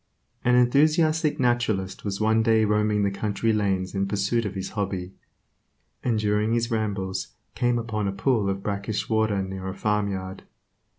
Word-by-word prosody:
An 125 Hz, 0 st, +4 dB
enthusiastic 155 Hz, +5 st, +3 dB
naturalist 120 Hz, -7 st, 0 dB
was 100 Hz, -1 st, -3 dB
one 110 Hz, +1 st, +3 dB
day 110 Hz, -1 st, +3 dB
roaming 105 Hz, 0 st, +2 dB
the 100 Hz, -, +1 dB
country 105 Hz, +2 st, -1 dB
lanes 95 Hz, -3 st, 0 dB
in 100 Hz, 0 st, 0 dB
pursuit 105 Hz, +3 st, 0 dB
of 100 Hz, -, -7 dB
his 95 Hz, -, -4 dB
hobby, 95 Hz, -3 st, -3 dB, 0.9 s
and 120 Hz, -3 st, +1 dB
during 105 Hz, +1 st, +1 dB
his 115 Hz, 0 st, 0 dB
rambles 100 Hz, -4 st, -2 dB, 0.2 s
came 120 Hz, -1 st, +1 dB
upon 110 Hz, -3 st, -2 dB
a -, -, 0 dB
pool 100 Hz, +1 st, +1 dB
of 95 Hz, 0 st, -3 dB
brackish 100 Hz, +1 st, -2 dB
water 110 Hz, -3 st, +1 dB
near 95 Hz, 0 st, -6 dB
a 95 Hz, -, -4 dB
farmyard. 100 Hz, -3 st, -2 dB
105 Hz, 160 wpm, -25 LUFS, 100-115 Hz, 0.9 s, An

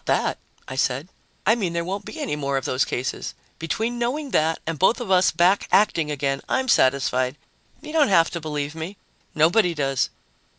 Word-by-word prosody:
"Not -, -, +4 dB
that," -, -, -2 dB, 0.3 s
I 130 Hz, -, -6 dB
said. 135 Hz, +5 st, 0 dB, 0.4 s
"I 215 Hz, -, +5 dB
mean 195 Hz, -7 st, -1 dB
there 170 Hz, 0 st, -1 dB
won't 195 Hz, +2 st, -4 dB
be -, -, -8 dB
any 150 Hz, -, -2 dB
more 140 Hz, -2 st, -1 dB
of 135 Hz, -, -3 dB
those 130 Hz, +1 st, +1 dB
cases. 125 Hz, +2 st, -4 dB, 0.2 s
Between 225 Hz, +8 st, -2 dB
knowing 270 Hz, +4 st, -2 dB
that 160 Hz, +1 st, +2 dB
and 165 Hz, -1 st, -3 dB
both 190 Hz, +7 st, +3 dB
of 230 Hz, -6 st, -4 dB
us 185 Hz, 0 st, +5 dB
back 180 Hz, +4 st, +2 dB
acting 170 Hz, -7 st, +3 dB
again, 140 Hz, -2 st, -1 dB
I'm 260 Hz, -1 st, 0 dB
satisfied. 130 Hz, -, +2 dB, 0.5 s
You 305 Hz, -, -8 dB
don't 315 Hz, -3 st, +4 dB
have 170 Hz, -5 st, +4 dB
to 170 Hz, -, -4 dB
believe 150 Hz, -1 st, -3 dB
me. 165 Hz, +5 st, -6 dB, 0.4 s
Nobody 175 Hz, +3 st, +3 dB
does." 135 Hz, -3 st, 0 dB
165 Hz, 195 wpm, -23 LUFS, 140-200 Hz, 0.5 s, I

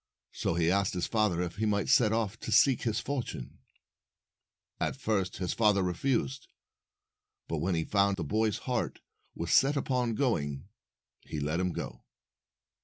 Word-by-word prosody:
So 80 Hz, -, -1 dB
he 85 Hz, 0 st, +2 dB
asked 100 Hz, -1 st, +1 dB
his 90 Hz, -, 0 dB
father 105 Hz, -6 st, +1 dB
if 90 Hz, +2 st, -5 dB
he 110 Hz, +1 st, 0 dB
might 100 Hz, -1 st, +1 dB
set 110 Hz, -4 st, +5 dB
off 110 Hz, -1 st, -1 dB
to -, -, -5 dB
seek 125 Hz, +5 st, +5 dB
his 110 Hz, -3 st, 0 dB
fortune. 140 Hz, -4 st, -5 dB, 1.2 s
At -, -, -1 dB
first 105 Hz, -8 st, -1 dB
his 90 Hz, -2 st, -2 dB
father 105 Hz, -4 st, +3 dB
refused, 125 Hz, +8 st, -1 dB, 1.0 s
but 80 Hz, -, -2 dB
when 90 Hz, +3 st, 0 dB
he 80 Hz, -, 0 dB
found 100 Hz, +2 st, +2 dB
that 85 Hz, -, -2 dB
the -, -, -6 dB
boy's 110 Hz, +3 st, +1 dB
heart 125 Hz, -3 st, -2 dB, 0.3 s
was -, -, -2 dB
set 140 Hz, +2 st, +5 dB
upon 125 Hz, -4 st, 0 dB
going, 75 Hz, -, -1 dB, 0.5 s
he 75 Hz, -, -6 dB
let 75 Hz, +4 st, -1 dB
him 90 Hz, 0 st, 0 dB
go. -, -, -6 dB
105 Hz, 165 wpm, -30 LUFS, 90-115 Hz, 1.2 s, set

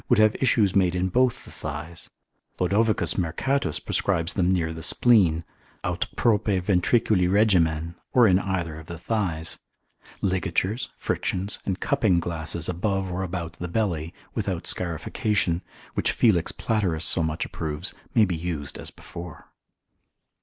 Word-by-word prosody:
would -, -, +5 dB
have 110 Hz, 0 st, +5 dB
issues 110 Hz, -7 st, +3 dB
made 90 Hz, -2 st, +3 dB
in 90 Hz, +1 st, 0 dB
both 125 Hz, +5 st, +1 dB
the -, -, -12 dB
thighs; 75 Hz, +2 st, -7 dB, 0.5 s
Lod. 90 Hz, -, +1 dB, 0.5 s
Mercatus 90 Hz, -, 0 dB
prescribes 90 Hz, -3 st, 0 dB
them 90 Hz, -2 st, +2 dB
near 80 Hz, -3 st, 0 dB
the 80 Hz, -, -7 dB
spleen, 90 Hz, -7 st, +4 dB, 0.4 s
aut -, -, -1 dB
prope 110 Hz, -4 st, +2 dB
ventriculi 95 Hz, 0 st, +2 dB
regimen, 85 Hz, -6 st, +3 dB, 0.2 s
or 125 Hz, -2 st, +6 dB
in 95 Hz, -1 st, +4 dB
either 85 Hz, -5 st, -3 dB
of 80 Hz, -, -12 dB
the 85 Hz, -, -6 dB
thighs. 85 Hz, -4 st, -2 dB, 0.6 s
Ligatures, 95 Hz, +4 st, 0 dB
frictions, 95 Hz, +3 st, -2 dB
and 95 Hz, -1 st, -1 dB
cupping 110 Hz, -11 st, +2 dB
glasses 85 Hz, -1 st, -2 dB
above 95 Hz, +1 st, -1 dB
or 90 Hz, +1 st, -2 dB
about 85 Hz, -2 st, -4 dB
the 90 Hz, -, -3 dB
belly, 85 Hz, -5 st, -1 dB, 0.2 s
without -, -, -2 dB
scarification, 90 Hz, -, 0 dB, 0.3 s
which -, -, 0 dB
Felix 90 Hz, -8 st, +3 dB
Platerus 95 Hz, -8 st, -1 dB
so 85 Hz, -, +3 dB
much 80 Hz, -1 st, -1 dB
approves, 80 Hz, +3 st, -4 dB, 0.2 s
may 110 Hz, -3 st, +6 dB
be 90 Hz, -3 st, -2 dB
used 80 Hz, -4 st, -3 dB
as -, -, -6 dB
before. 85 Hz, -1 st, -10 dB
90 Hz, 140 wpm, -25 LUFS, 80-100 Hz, 0.6 s, or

